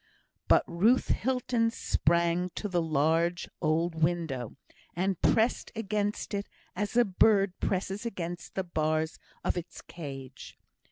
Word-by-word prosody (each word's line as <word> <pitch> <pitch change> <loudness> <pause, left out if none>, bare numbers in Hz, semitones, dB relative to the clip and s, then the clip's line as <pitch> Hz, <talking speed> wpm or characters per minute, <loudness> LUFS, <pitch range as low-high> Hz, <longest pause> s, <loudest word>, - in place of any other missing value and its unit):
But - - +5
Ruth 215 +9 +2
Hilton 245 -2 +1
sprang 170 -3 +1
to 210 - -3
the 180 -3 +1
large 165 +3 +1
old 165 +2 +1
window, 160 -7 -1 0.4
and 185 +1 -1
pressed 225 +2 +2
against 210 -1 -2
it 200 0 -3 0.3
as 205 +4 -2
a 245 - +6
bird 195 -1 +3
presses 195 +2 -1
against 175 -6 -5
the 190 - 0
bars 155 -2 -1 0.2
of - - 0
its 175 - -6
cage. 135 -5 -9
175 Hz, 125 wpm, -29 LUFS, 165-205 Hz, 0.4 s, a